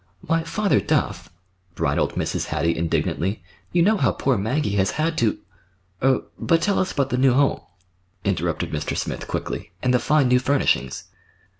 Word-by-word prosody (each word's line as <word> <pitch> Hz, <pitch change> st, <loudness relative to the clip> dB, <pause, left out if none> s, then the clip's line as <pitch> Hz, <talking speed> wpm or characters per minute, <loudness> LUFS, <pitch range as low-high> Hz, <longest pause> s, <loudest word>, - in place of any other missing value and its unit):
"Why, 165 Hz, +1 st, 0 dB
Father 200 Hz, +5 st, +1 dB
Duff," 100 Hz, -, -1 dB, 0.5 s
bridled -, -, 0 dB
Mrs. -, -, -1 dB
Hattie 85 Hz, 0 st, 0 dB
indignantly, 85 Hz, +4 st, -1 dB, 0.3 s
"you 175 Hz, -1 st, +3 dB
know 215 Hz, +4 st, +4 dB
how -, -, +2 dB
poor 135 Hz, -1 st, 0 dB
Maggie 110 Hz, +3 st, -1 dB
has 95 Hz, 0 st, +2 dB
had 160 Hz, +2 st, 0 dB
to—" 115 Hz, -3 st, +1 dB, 0.6 s
"Er—but 135 Hz, +5 st, +1 dB
tell 200 Hz, +3 st, +1 dB
us 185 Hz, -, 0 dB
about 140 Hz, -1 st, -1 dB
the 125 Hz, -, +1 dB
new 130 Hz, -1 st, +5 dB
home," 140 Hz, +2 st, +2 dB, 0.6 s
interrupted -, -, -1 dB
Mr. 75 Hz, 0 st, -3 dB
Smith -, -, -4 dB
quickly, -, -, -4 dB
"and 125 Hz, -, +2 dB
the 125 Hz, -, +4 dB
fine 150 Hz, +2 st, +3 dB
new 125 Hz, 0 st, +4 dB
furnishings." 130 Hz, -, 0 dB
135 Hz, 160 wpm, -23 LUFS, 105-160 Hz, 0.6 s, new